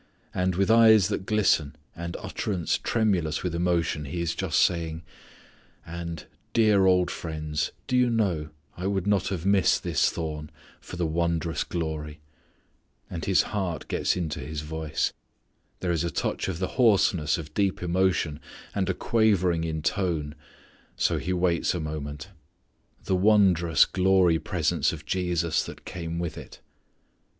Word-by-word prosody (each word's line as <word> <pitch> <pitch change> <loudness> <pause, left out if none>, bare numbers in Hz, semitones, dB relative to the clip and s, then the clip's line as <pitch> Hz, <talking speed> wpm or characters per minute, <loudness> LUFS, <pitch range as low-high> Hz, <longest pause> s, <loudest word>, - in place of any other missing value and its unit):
And 90 -1 0
with 100 +4 +2
eyes 110 -4 +6
that 95 - -3
glisten, 95 -9 +2 0.2
and 85 0 -5
utterance 95 -6 -2
tremulous 95 -9 0
with 90 -2 -2
emotion 85 -3 0
he 75 +5 -4
is 85 0 -1
just 95 -5 -1
saying: 85 -2 +1 0.8
"And 85 -1 -6 0.3
dear 105 -4 +4
old 90 -1 +3
friends, 75 -2 -3
do 125 - -1
you 125 -1 +4
know, 95 -10 0 0.3
I 90 +2 -3
would 100 -2 -1
not 100 -3 +2
have 90 -3 -3
missed 100 -1 +3
this - - +2
thorn, 75 -2 -5 0.3
for - - -10
the 85 -1 -1
wondrous 85 0 -1
glory" 80 -2 -4 0.9
and 85 -2 -4
his 95 -2 +4
heart 90 -6 -2
gets - - 0
into 80 -5 -3
his 75 +3 -5
voice, 80 0 -2 0.7
there 90 - 0
is 85 -1 0
a 85 - -1
touch - - -2
of 95 -4 -3
the 95 +1 -2
hoarseness 95 -9 +3
of 75 -2 -8
deep 100 -1 0
emotion, 90 -4 +1 0.3
and - - -1
a - - 0
quavering 90 -7 +2
of 80 -1 -4
tone, 80 -6 -1 0.6
so - - +1
he 90 - -3
waits 90 -1 +1
a - - -2
moment 75 +1 -5 0.7
"the 95 - 0
wondrous 90 -5 +4
glory 90 -3 +3
presence - - 0
of 75 -2 -8
Jesus 85 -1 0
that - - -10
came 85 -1 -5
with 85 -1 -4
it." - - -12
85 Hz, 150 wpm, -26 LUFS, 80-95 Hz, 0.9 s, eyes